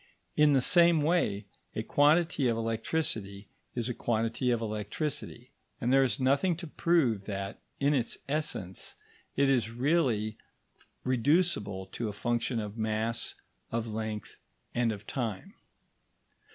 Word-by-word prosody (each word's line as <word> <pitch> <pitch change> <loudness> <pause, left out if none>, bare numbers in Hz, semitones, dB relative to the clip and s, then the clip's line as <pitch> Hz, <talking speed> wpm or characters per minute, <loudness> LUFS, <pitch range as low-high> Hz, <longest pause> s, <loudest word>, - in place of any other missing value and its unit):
In 150 -1 +5
the 130 -2 +4
same 170 -2 +5
way, 145 - +1 0.3
a - - -1
quantity 150 -1 +3
of 115 -1 +1
electricity 110 -3 -2 0.3
is 120 -2 0
a 125 - -1
quantity 115 +2 0
of 120 -2 +2
electricity; 115 +4 -4 0.3
and 125 -1 +1
there 135 - +6
is 130 0 +1
nothing 140 +7 +3
to 170 - -6
prove 145 - +1
that, 100 0 -4 0.2
in 140 +1 +3
its 125 -5 0
essence, 140 - -3 0.4
it 140 0 +3
is 125 -5 +2
really 120 -4 +1 0.6
reducible 130 - +1
to 115 - -3
a - - -5
function 120 +2 -1
of 105 +1 -5
mass, 110 +1 0 0.4
of 115 0 -1
length, 110 -1 -5 0.3
and 120 -1 +2
of 105 0 -7
time. 125 - -4
120 Hz, 135 wpm, -30 LUFS, 110-145 Hz, 0.6 s, there